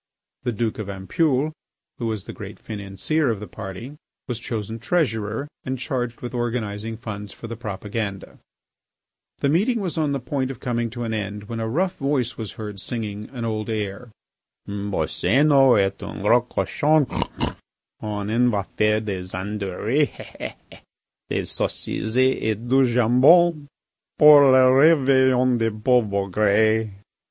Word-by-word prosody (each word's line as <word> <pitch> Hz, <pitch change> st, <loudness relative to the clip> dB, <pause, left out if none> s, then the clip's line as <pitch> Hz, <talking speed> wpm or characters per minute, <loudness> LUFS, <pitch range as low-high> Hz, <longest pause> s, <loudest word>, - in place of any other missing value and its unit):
The 125 Hz, -, -1 dB
Duke 110 Hz, 0 st, -2 dB
of 105 Hz, -2 st, -5 dB
Ampoule, 130 Hz, -, 0 dB, 0.5 s
who 120 Hz, -, -2 dB
was 110 Hz, -4 st, -3 dB
the -, -, -8 dB
great -, -, -9 dB
financier 105 Hz, +9 st, -2 dB
of 110 Hz, -4 st, -1 dB
the 105 Hz, -, -6 dB
party, 110 Hz, +8 st, -8 dB, 0.3 s
was 120 Hz, -2 st, -3 dB
chosen 110 Hz, -1 st, -5 dB
treasurer 115 Hz, -4 st, -1 dB, 0.2 s
and 130 Hz, 0 st, -3 dB
charged 125 Hz, -2 st, -3 dB
with 120 Hz, -, -6 dB
organising 115 Hz, -2 st, -3 dB
funds 105 Hz, -3 st, -7 dB
for -, -, -11 dB
the 115 Hz, +1 st, -5 dB
propaganda. 105 Hz, -2 st, -5 dB, 1.0 s
The 140 Hz, -, +2 dB
meeting 210 Hz, -, +2 dB
was 180 Hz, -5 st, -3 dB
on 150 Hz, -2 st, +1 dB
the 140 Hz, -, -1 dB
point 130 Hz, +1 st, -2 dB
of 135 Hz, -, -7 dB
coming 120 Hz, -3 st, -1 dB
to 120 Hz, +1 st, -6 dB
an 115 Hz, -1 st, -3 dB
end 105 Hz, -1 st, -4 dB
when 115 Hz, +2 st, -6 dB
a 110 Hz, 0 st, -2 dB
rough 180 Hz, +8 st, 0 dB
voice 135 Hz, -5 st, -1 dB
was 110 Hz, -4 st, -6 dB
heard 105 Hz, -2 st, -7 dB
singing 105 Hz, -1 st, -5 dB
an 120 Hz, -3 st, -5 dB
old 110 Hz, 0 st, -3 dB
air: 105 Hz, +2 st, -4 dB, 0.6 s
Boscénos 120 Hz, +6 st, +3 dB
est 100 Hz, 0 st, 0 dB
un -, -, -7 dB
gros 120 Hz, +3 st, +4 dB
cochon; 150 Hz, 0 st, +2 dB, 0.9 s
On 105 Hz, -1 st, -4 dB
en 120 Hz, +2 st, +3 dB
va 100 Hz, -4 st, 0 dB
faire 105 Hz, 0 st, +2 dB
des 95 Hz, -4 st, -5 dB
andouilles 105 Hz, +8 st, -1 dB, 1.2 s
Des -, -, -1 dB
saucisses 110 Hz, +1 st, -3 dB
et 130 Hz, -4 st, +2 dB
du 130 Hz, +1 st, +4 dB
jambon 145 Hz, +7 st, +5 dB, 0.5 s
Pour 150 Hz, -1 st, +9 dB
le 130 Hz, 0 st, +6 dB
réveillon 130 Hz, -5 st, +4 dB
des 115 Hz, 0 st, +2 dB
pauv' 110 Hz, +1 st, +2 dB
bougres. 105 Hz, +3 st, +2 dB
115 Hz, 145 wpm, -23 LUFS, 105-130 Hz, 1.2 s, Pour